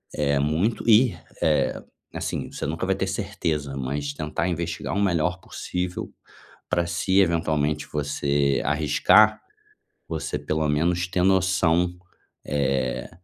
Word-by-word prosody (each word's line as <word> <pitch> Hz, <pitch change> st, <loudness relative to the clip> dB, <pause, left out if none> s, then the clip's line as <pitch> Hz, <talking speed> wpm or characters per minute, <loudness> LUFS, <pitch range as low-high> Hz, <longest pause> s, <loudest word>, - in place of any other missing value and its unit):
eh, 70 Hz, -1 st, +1 dB
muito 80 Hz, +10 st, 0 dB
e, 115 Hz, +1 st, +5 dB, 0.3 s
eh, 75 Hz, -1 st, +1 dB, 0.3 s
assim, -, -, -4 dB
você -, -, -5 dB
nunca 80 Hz, +5 st, -2 dB
vai 95 Hz, 0 st, +1 dB
ter 95 Hz, 0 st, -2 dB
certeza, 85 Hz, -9 st, -2 dB
mas 70 Hz, +2 st, -3 dB
tentar 75 Hz, +4 st, -2 dB
investigar 85 Hz, -1 st, -3 dB
o 100 Hz, -, +1 dB
melhor 90 Hz, -2 st, +1 dB
possível, 90 Hz, -4 st, -4 dB, 0.6 s
pra 85 Hz, -1 st, +1 dB
se 85 Hz, +3 st, +2 dB
eventualmente 75 Hz, -4 st, +1 dB
você 70 Hz, -1 st, 0 dB
arriscar, 80 Hz, +9 st, +4 dB, 0.7 s
você 80 Hz, -2 st, -3 dB
pelo 75 Hz, 0 st, -1 dB
menos 85 Hz, +4 st, +1 dB
ter 90 Hz, 0 st, 0 dB
noção, 90 Hz, -2 st, +2 dB, 0.5 s
eh, 70 Hz, -3 st, -1 dB
80 Hz, 120 wpm, -24 LUFS, 75-95 Hz, 0.7 s, e